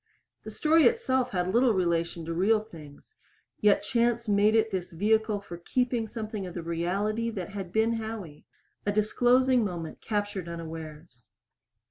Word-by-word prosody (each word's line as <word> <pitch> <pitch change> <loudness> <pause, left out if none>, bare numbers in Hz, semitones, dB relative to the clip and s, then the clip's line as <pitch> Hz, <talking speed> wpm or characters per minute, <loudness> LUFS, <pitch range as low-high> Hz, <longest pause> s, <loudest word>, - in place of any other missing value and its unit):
The - - -7
story 320 +1 +3
itself 260 - +1
had 180 0 -1
little 240 -1 +4
relation 170 -2 0
to 165 - -3
real 210 +6 +3
things 160 - -14 0.5
yet 205 -1 +4
chance 235 +1 +1
made 205 +1 +3
it 220 0 +2
this 185 -1 -3
vehicle 215 +4 +1
for 175 -4 -9
keeping 240 +5 -1
something 215 -3 -5
of 175 - -9
the 170 - -4
reality 195 +7 -1
that 195 -6 -5
had 195 -3 -6
been 220 +3 +2
Howie 220 -9 -6 0.4
a 205 - 0
disclosing 245 +4 +3
moment 170 -5 -5
captured 205 -4 -3
unawares. 160 -5 -9
205 Hz, 150 wpm, -28 LUFS, 170-225 Hz, 0.5 s, little